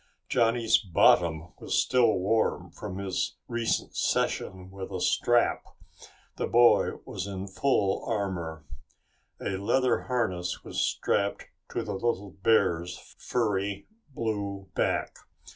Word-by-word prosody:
Johnny's 115 -1 +3
bottom 85 -4 +3
was - - -2
still 125 -3 +4
warm 100 +4 0
from 100 -3 -7
his 100 -1 -2
recent 120 -1 -1
session 95 -1 -1
with 95 0 -7
a 95 - -3
strap. 120 +6 +2 0.7
The - - -1
boy 120 0 +5
was 95 +1 -5
in 95 -1 -5
full 100 -1 +1
armor. 90 -8 -3 0.7
A 95 - -2
leather 125 +5 +1
harness 95 -8 -1
was - - -3
strapped 100 0 0 0.2
to - - -2
the 105 - -4
little 100 -1 -2
bear's 90 -5 +2 0.2
furry 100 -4 -1 0.3
blue 100 -3 -3
back. - - 0
100 Hz, 115 wpm, -28 LUFS, 95-115 Hz, 0.7 s, boy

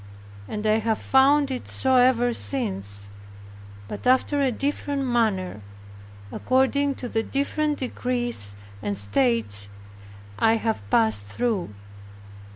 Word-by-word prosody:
And 210 0 -5
I 215 +1 +3
have 220 0 0
found 275 +1 +3
it 255 - -5
so 260 -1 +1
ever 245 -1 +4
since, 100 - -1 0.8
but 180 - -6
after 260 +3 +3
a 265 -2 +2
different 280 +2 -2
manner, 215 - 0 0.7
according 270 +2 +1
to 250 - -6
the 225 -1 0
different 290 +4 -1
degrees 240 - -2 0.3
and 100 -1 -2
states 100 -1 +1 0.7
I 225 0 +4
have 225 -1 -1
passed 105 -1 +2
through. 200 - -2
235 Hz, 115 wpm, -24 LUFS, -, 0.8 s, ever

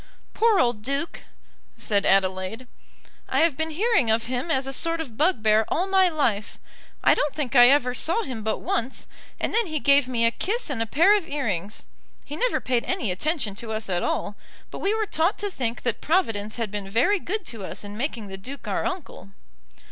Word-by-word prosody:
"Poor 445 -3 +3
old 240 -4 +1
Duke!" 275 +7 -3 0.5
said 205 -3 +1
Adelaide. 190 +4 +1 0.6
"I - - +2
have 325 -4 +3
been 320 +2 -2
hearing 380 - +2
of 225 +1 +2
him 255 +5 -3
as 265 -4 +1
a 270 - -4
sort 330 +4 +1
of 265 -9 -6
bugbear 220 - +3
all 355 - 0
my 380 -1 +4
life. 235 -10 -1 0.5
I - - +6
don't 295 - -1
think 285 -3 -3
I 245 0 +9
ever 265 -3 +3
saw 340 - +2
him 250 - -5
but 215 0 -1
once, 245 +3 -2 0.3
and - - -2
then 460 -2 +2
he 310 -2 -2
gave 280 -1 +4
me 235 -2 +1
a 230 - +4
kiss 425 - -2
and 240 -5 -2
a 225 - -1
pair 340 - +5
of 390 -5 -2
earrings. 210 - -3 0.4
He 295 - -6
never - - +1
paid 245 -2 0
any 360 - -1
attention 250 - -1
to 230 0 -6
us 215 -2 -3
at 175 -1 0
all, 205 - -2 0.4
but - - -7
we 400 +2 +1
were 440 -1 0
taught 340 0 +1
to 410 -1 -3
think 240 -7 -3
that 235 -3 -1
Providence 225 - 0
had 230 -4 -3
been 205 -2 -5
very 350 - +2
good 395 +3 -4
to 225 -4 -8
us - - -6
in 205 0 -8
making 235 -2 -3
the 195 -1 -7
Duke 265 +9 -9
our - - -1
uncle." 345 - -7
260 Hz, 210 wpm, -24 LUFS, 220-330 Hz, 0.6 s, I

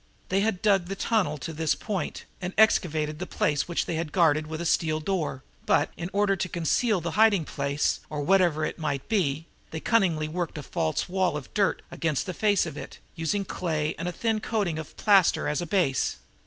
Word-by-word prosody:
They 190 - +2
had 205 -3 -1
dug 195 -4 +4
the 195 - -4
tunnel 190 -8 0
to 150 +4 -6
this 160 0 0
point 205 -4 -4 0.2
and 180 +1 -4
excavated 155 -7 +2
a 180 - -3
place 145 -1 0
which 170 - -1
they 165 - -2
had 165 -2 -3
guarded 155 -3 +3
with 160 0 -5
a 170 - -3
steel 155 -1 +1
door, 155 -6 -2 0.2
but, 145 - +3
in 175 +1 -5
order 200 0 +2
to 185 0 -3
conceal 180 +5 +1
the 170 0 -3
hiding 205 -3 +4
place, 140 +1 -1
or 150 -1 -3
whatever 175 -2 +3
it - - -5
might 145 -4 -2
be, 160 -8 0 0.2
they 160 - -5
cunningly 170 -8 +2
worked 170 +1 -3
the 150 - -6
false 80 -10 -1
wall 180 -4 0
of 145 - -10
dirt 200 -3 +1
against 155 -5 -1
the 185 - -4
face 205 0 +2
of - - -7
it, - - -8 0.2
using 180 +5 -1
clay 155 -4 -2
and 170 - -3
a - - -1
thin 220 +3 -1
coating 205 -8 -1
of 160 - -9
plaster 195 -4 +4
as 150 - 0
a 175 - -4
base. 160 -8 +1
170 Hz, 210 wpm, -27 LUFS, 155-195 Hz, 0.2 s, dug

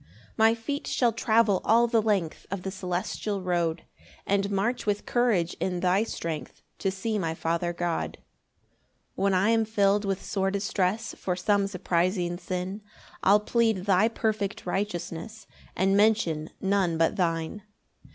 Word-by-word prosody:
3 - - -26 0.3
My 225 +1 +4
feet 280 +6 -4
shall 240 -3 +2
travel 220 -3 +3
all 230 +2 +5
the 230 -1 +2
length 200 -7 -1
Of 195 -2 -4
the 190 - -3
celestial 190 +2 -3
road, 170 -2 0 0.4
And 200 0 +1
march 215 +5 -1
with 205 0 0
courage 220 -9 +1
in 180 -1 -1
thy 185 +2 +3
strength 165 -8 -5 0.2
To 195 - 0
see 210 +3 -2
my 165 -3 -2
Father 170 +1 -1
God. 175 -1 -2 1.0
4 - - -3
When 200 - +3
I 190 +4 +3
am 225 -1 +3
fill'd 205 -1 +2
with 195 -1 -2
sore 195 -1 0
distress 200 +2 -1
For 180 - -2
some 200 +2 +1
surprising 175 -1 0
sin, 185 +3 -4 0.4
I'll 205 +1 +5
plead 220 -4 +1
thy 195 +1 +4
perfect 215 -3 -2
righteousness, 190 +2 -4 0.3
And 195 +2 +2
mention 200 -8 +2
none 190 -4 +1
but 165 0 +2
thine. 165 +2 -1
195 Hz, 150 wpm, -27 LUFS, 180-215 Hz, 1.0 s, all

